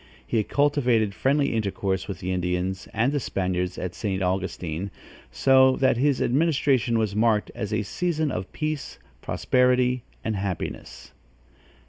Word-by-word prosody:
He 110 -2 +1
cultivated 125 -7 +2
friendly 140 +4 +1
intercourse 100 -3 -1
with 100 - -6
the 90 - -2
Indians 90 +1 -2
and 115 +5 +1
the 145 - 0
Spaniards 90 -5 -2
at 90 -1 -4
St. 95 0 -2
Augustine, 90 -1 -2 0.4
so 130 - +5
that 130 -3 +2
his 140 +1 +2
administration 135 -4 +2
was 110 -3 0
marked 110 -1 +2
as 110 -3 -4
a 105 -1 0
season 160 - -1
of 90 -4 -4
peace, 155 -1 -4 0.2
prosperity 125 0 +2 0.2
and 110 - -1
happiness. 95 -3 -5
110 Hz, 135 wpm, -25 LUFS, 95-130 Hz, 0.4 s, so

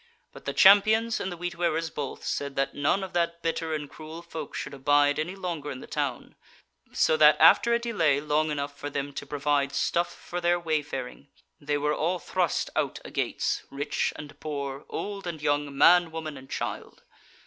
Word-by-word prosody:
But - - -13
the 140 - -2
Champions 215 +6 +6
and 190 - -3
the 175 - -6
Wheat 175 0 -4
wearers 165 -2 -1
both, 140 -3 -5
said 140 -1 -3
that 135 0 0
none 145 +7 +1
of 190 - -7
that 170 -1 -1
bitter 165 -1 -1
and 150 -1 -5
cruel 160 +3 -10
folk 160 -3 -7
should 135 - -5
abide 145 +2 +3
any 175 +5 -3
longer 170 -6 -4
in 130 - -6
the - - -9
town; - - -3 0.6
so 485 - +3
that - - +7
after 235 - +6
a 235 - +4
delay 175 -12 +1
long 150 +1 +1
enough 145 -1 -3
for 145 +1 -6
them 140 0 -4
to - - -6
provide 145 -1 0
stuff 170 +1 +1
for 175 0 -6
their 175 0 +2
wayfaring, 150 -5 -3 0.3
they 145 0 -1
were 150 +1 0
all 170 +5 0
thrust 180 -1 -1
out - - -1
a - - -8
gates, - - -1
rich 140 +1 -1
and 145 -1 -10
poor, 140 -2 -5
old 200 -2 -5
and 165 -3 -4
young, 145 -1 0
man, 175 +1 +6
woman 160 -2 -6
and 135 -1 -12
child. - - -5
155 Hz, 190 wpm, -27 LUFS, 145-175 Hz, 0.6 s, that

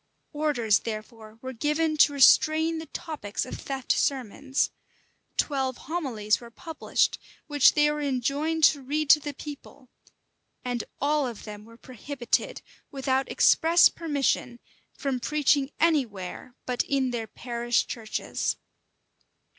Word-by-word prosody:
Orders 275 -8 +2
therefore 220 0 -8
were 260 0 -5
given 305 +5 0
to 295 - +6
restrain 315 +4 +5
the 320 - -8
topics 290 -10 -5
of - - -7
theft 270 -2 -3
sermons: 270 +1 0 0.7
twelve 265 -3 0
homilies 255 -11 -1
were 235 - -11
published, 320 +7 -1 0.3
which 290 -2 +5
they 295 0 +4
were 300 0 -3
enjoined 285 +4 -1
to 290 -2 +5
read 295 +3 +1
to 300 - +7
the 290 -1 -6
people: 285 -3 -10 0.8
and 245 -2 -2 0.2
all 290 -1 +1
of 235 -4 -8
them 210 -1 -9
were 230 +1 -16
prohibited, 260 - -3 0.3
without 265 -1 -1
express 335 +1 +5
permission, 280 -6 -1 0.4
from 270 -3 -2
preaching 285 0 +1
any 320 -4 +4
where 200 +5 -9
but 250 -1 0
in 270 -2 0
their 230 -2 -3
parish 240 +1 -1
churches. 220 -3 -3
270 Hz, 130 wpm, -26 LUFS, 240-300 Hz, 0.8 s, to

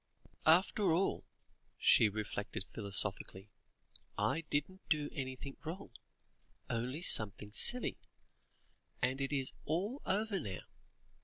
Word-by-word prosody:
"After 180 +3 +5
all," 190 +3 0 0.5
she 110 - +5
reflected 105 -2 -4
philosophically, 100 -1 -1 0.7
"I 110 +11 0
didn't 185 +7 -1
do 150 -3 +1
anything 130 0 -5
wrong 170 +5 -6 0.8
only 125 +7 -2
something 105 - +2
silly 245 - +5 1.0
and 130 +2 0
it 135 - -1
is 135 -2 0
all 200 - -2
over 205 0 0
now. 95 - -5
140 Hz, 100 wpm, -35 LUFS, 110-180 Hz, 1.0 s, After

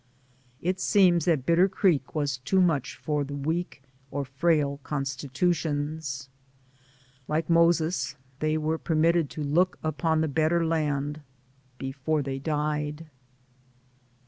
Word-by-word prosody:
It 185 +2 0
seems 180 -6 +4
that 155 -7 +1
Bitter 175 +3 +4
Creek 175 -9 +1
was 145 -4 -1
too 190 +9 +1
much 165 -8 +1
for 145 +4 -1
the 140 0 -6
weak 160 0 -3 0.3
or 140 0 -3
frail 140 +1 +1
constitutions. 145 0 -2 1.0
Like 155 +2 -1
Moses, 170 -1 +3 0.2
they 155 0 +1
were 155 +1 -1
permitted 165 -1 +2
to 155 - -5
look 170 +6 +2
upon 155 +1 +1
the 160 - +1
better 160 +3 +1
land 150 -2 -1 0.6
before 135 +3 -2
they 135 0 -4
died. 150 +1 -2
155 Hz, 120 wpm, -27 LUFS, 140-165 Hz, 1.0 s, seems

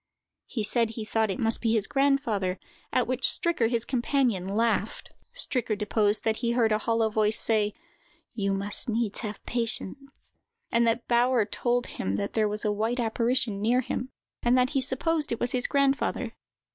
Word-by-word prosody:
He 225 - -3
said 230 +2 +1
he 225 -1 -6
thought 220 0 0
it 190 - -2
must 225 0 0
be 225 -2 +1
his 220 -3 +2
grandfather, 270 -10 +1 0.3
at 250 - +2
which 255 +1 -2
Stricker, 330 -10 +1
his 235 -1 -1
companion, 240 -6 0
laughed. 220 +1 -1 0.2
Stricker 250 - -1
deposed 210 0 +1
that 220 -1 +1
he 235 0 0
heard 230 -2 +2
a 215 - +2
hollow 225 0 +1
voice 215 0 +1
say: 210 -2 +1 0.6
"You 200 -4 -1
must 200 +4 -1
needs 225 -2 -1
have 210 -3 -6
patience;" 245 +3 -2 0.4
and 235 0 +3
that 230 +1 0
Bauer 240 -1 +3
told 240 +3 0
him 95 +1 -3
that 100 0 -3
there 215 -2 +2
was 210 +1 -3
a 210 - +2
white 220 +4 -1
apparition 230 -2 0
near 240 +4 +3
him, 255 +1 -4 0.3
and 245 +1 +3
that 255 +1 +2
he 275 -3 +1
supposed 295 +4 0
it 235 - -2
was 240 - 0
his 250 -1 +2
grandfather. 275 -1 +1
230 Hz, 180 wpm, -27 LUFS, 215-250 Hz, 0.6 s, and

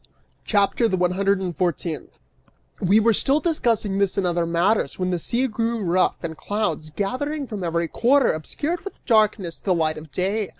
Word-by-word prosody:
CHAPTER 205 +3 +2
THE 190 - 0
ONE 180 0 +2
HUNDRED 195 +1 +1
AND 180 -3 -3
FOURTEENTH. 170 -3 -3 0.6
We 195 +4 +4
were 225 +1 +4
still 275 +7 +2
discussing 230 - 0
this 200 -2 +1
and 195 - +1
other 170 -1 0
matters 175 +6 +1
when 185 0 -1
the 175 - -1
sea 240 +9 0
grew 230 -1 -1
rough, 180 +1 +1
and 160 -1 -4
clouds, 170 -6 -2
gathering 275 - -3
from 210 -6 -6
every 170 0 0
quarter, 255 - +3
obscured 295 - -3
with 395 - -10
darkness 215 -6 +2
the 185 -3 0
light 155 -2 0
of 155 -1 -13
day. 195 +5 -1
195 Hz, 180 wpm, -23 LUFS, 175-230 Hz, 0.6 s, We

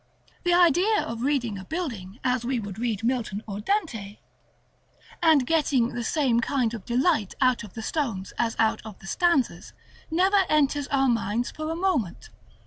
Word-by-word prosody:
The 350 -1 +2
idea 360 +5 +4
of 230 0 -5
reading 245 -7 0
a - - -8
building 230 - -5
as 250 -1 +1
we 250 0 -1
would 205 -2 -7
read 225 -3 -2
Milton 230 -4 -1
or 200 -1 -5
Dante, 225 - -2 1.0
and 315 -6 +5
getting 280 -6 +2
the 240 -1 -4
same 250 -1 +1
kind 240 -1 0
of 220 -5 -7
delight 245 - +1
out 255 -3 +2
of 210 - -12
the 225 - -5
stones 225 -10 -3
as 230 -1 0
out 220 0 +2
of 215 -3 -9
the - - -15
stanzas, 340 - 0 0.4
never 380 +4 +3
enters 290 -1 +2
our 270 -1 +2
minds 230 0 0
for 310 0 -5
a 325 - -2
moment. 330 - -1
250 Hz, 170 wpm, -26 LUFS, 225-310 Hz, 1.0 s, and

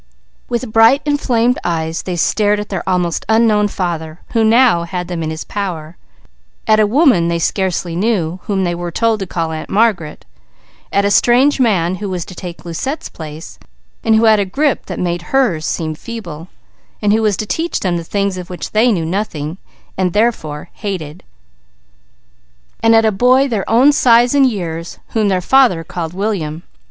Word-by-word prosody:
With 240 -2 -3
bright 225 +6 +5
inflamed 250 -4 +1
eyes 160 -1 -2
they 180 - -4
stared 205 +4 +1
at 210 - -6
their 190 -3 -3
almost 180 -2 0
unknown 220 -2 +3
father, 170 -4 -4
who 225 -2 +1
now 225 -4 +4
had 180 +1 -4
them 175 -2 -4
in 155 - -2
his 160 0 -5
power; 175 -5 -5 0.7
at 215 0 +4
a 215 - +4
woman 245 - +3
they 170 0 0
scarcely 180 -1 -1
knew, 185 -4 -1
whom 195 -2 -1
they 175 -1 0
were 175 0 -4
told 225 +5 0
to 195 - -4
call 165 -2 -3
Aunt 155 -1 -6
Margaret; 195 -8 0 0.7
at 200 0 +2
a 200 - +1
strange 250 +7 +4
man 185 -7 +1
who 205 +1 -5
was 180 -2 -3
to - - -11
take 180 -1 -9
Lucette's 260 - -4
place, 155 0 -10 0.4
and 225 -2 +3
who 220 - +3
had 220 -1 +5
a - - +2
grip 280 +8 -1
that - - -5
made 175 -1 -2
hers 185 -7 0
seem 160 -1 -2
feeble, 170 -4 -8 0.5
and 205 -1 +2
who 220 - +2
was 210 -3 +1
to 215 - -3
teach 330 +10 -2
them 180 -3 0
the 170 - -5
things 200 +1 -2
of 180 +1 -9
which 180 - -6
they 230 +3 +3
knew 170 -6 -1
nothing, 170 -3 -3 0.4
and 180 -2 0
therefore 175 -9 -1
hated; 180 -5 -6 1.6
and 225 0 +4
at 225 0 +4
a 220 - +3
boy 250 +6 +4
nearer 275 - +1
their 215 -5 -2
own 250 +6 +5
size 240 -3 +4
and 275 -2 +4
years, 170 -6 -5
whom 220 -2 0
their 185 -2 +1
father 235 -6 +3
called 165 +1 -6
William. 175 -6 -3
195 Hz, 185 wpm, -16 LUFS, 170-225 Hz, 1.6 s, bright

